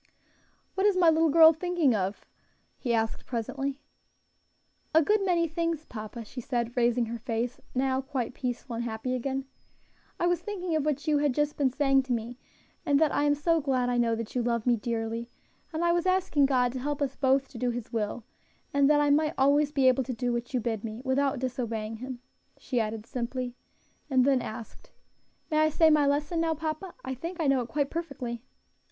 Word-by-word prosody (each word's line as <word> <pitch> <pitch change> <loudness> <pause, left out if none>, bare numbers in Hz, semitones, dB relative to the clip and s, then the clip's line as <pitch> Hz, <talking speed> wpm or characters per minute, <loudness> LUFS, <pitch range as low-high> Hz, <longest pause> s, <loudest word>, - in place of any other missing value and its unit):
"What 390 +2 +2
is 400 -3 +2
my 340 -3 +6
little 320 0 +3
girl 320 +2 +8
thinking 340 -5 +1
of?" 195 -1 -2 0.5
he 245 - -2
asked 225 -1 -1
presently. 275 +4 -3 1.1
"A 320 - +7
good 420 +4 +2
many 345 -3 +2
things, 330 -1 -2
papa," 220 +1 -7
she 250 +4 -7
said, 240 -1 -2
raising 240 -1 +2
her 230 +1 -5
face, 235 +2 -3 0.2
now 260 0 +1
quite 260 -3 -3
peaceful 245 -1 -4
and 235 - -2
happy 230 +2 -3
again. 265 +2 -2 0.7
"I - - +1
was 350 -1 +1
thinking 365 -5 -3
of 305 -2 0
what 300 -1 -1
you 300 -1 +3
had 290 -3 +1
just 295 0 0
been 280 -2 +2
saying 270 +1 +3
to 255 - -1
me, 235 +2 -4 0.4
and 285 -4 +3
that 315 -2 +3
I 290 - +2
am 290 0 +3
so 330 +2 +1
glad 255 -3 +1
I 245 - +1
know 230 -1 +2
that 225 -1 -6
you 250 - 0
love 235 -2 -1
me 245 -1 +4
dearly; 230 +1 -3 0.4
and 325 +1 -1
I 340 - +4
was 345 +1 +1
asking 370 -7 +3
God 250 -2 +2
to 260 - -5
help 290 +2 -2
us 275 -2 -1
both 270 0 +2
to 240 - -10
do 250 0 0
His 240 -1 -5
will, 220 +1 -2 0.5
and 280 0 +4
that 295 -1 +5
I 290 -1 +3
might 305 +2 +2
always 285 +2 +3
be 275 -3 +3
able 255 +1 +4
to 255 - -3
do 245 +1 -1
what 240 0 -3
you 255 - 0
bid 225 -2 -2
me, 225 +2 -6
without 275 +1 +1
disobeying 230 -3 -3
Him," 250 +1 -7 0.4
she 250 - -2
added 220 -1 -3
simply; 250 0 -4 0.5
and 260 -2 +4
then 270 -2 +3
asked, 220 0 -8 0.6
"May 305 - +3
I 310 0 +4
say 315 +1 +4
my 295 -2 +4
lesson 295 +4 0
now, 325 -1 +1
papa? 315 +4 -4
I 260 - -3
think 335 +7 -6
I 320 - 0
know 275 -2 +3
it 240 - -6
quite 285 +3 -1
perfectly." 270 -8 -4
265 Hz, 205 wpm, -28 LUFS, 240-300 Hz, 1.1 s, girl